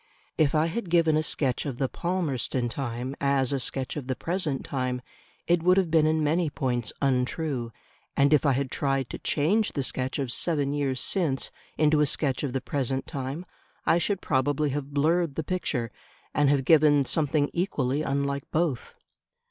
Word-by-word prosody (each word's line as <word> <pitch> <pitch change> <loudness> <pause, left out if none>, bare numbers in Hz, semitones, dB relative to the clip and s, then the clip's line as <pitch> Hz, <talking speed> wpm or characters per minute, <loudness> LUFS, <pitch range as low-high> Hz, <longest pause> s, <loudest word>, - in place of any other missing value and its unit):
If 155 -1 +2
I 155 +1 +3
had 175 +3 -3
given 165 -2 +4
a 155 - +3
sketch 140 -4 0
of 130 -4 -4
the 135 - 0
Palmerston 140 -8 -1
time 125 +1 -4
as 140 -1 +2
a 135 - 0
sketch 130 +1 -2
of 145 -4 -5
the 130 - -1
present 165 -5 -2
time, 125 -2 -2 0.4
it 175 -1 +2
would 180 +2 +4
have 185 -4 +2
been 160 -1 +4
in 155 0 +2
many 160 +2 +1
points 125 -6 -1
untrue; 130 -1 0 0.5
and 140 +2 +4
if 150 - +4
I 140 -3 +3
had 130 0 -1
tried 135 -2 -1
to - - -6
change 195 +9 +1
the 140 - -1
sketch 130 0 -2
of 135 -4 -2
seven 145 -1 0
years 135 -3 -1
since 160 -9 0 0.3
into 155 0 +4
a 150 - +3
sketch 135 -2 0
of 145 - -2
the 135 - -1
present 135 -1 -2
time, 140 +3 -5 0.4
I 170 - +4
should 195 +2 -1
probably 145 +2 +1
have 145 0 -4
blurred 155 +1 +1
the 160 - -2
picture 145 -9 -2 0.4
and 145 -1 +3
have 140 -2 +2
given 150 -2 +5
something 145 +1 +1
equally 150 -6 0
unlike 140 -1 -2
both. 155 -6 -1
145 Hz, 180 wpm, -27 LUFS, 135-160 Hz, 0.5 s, given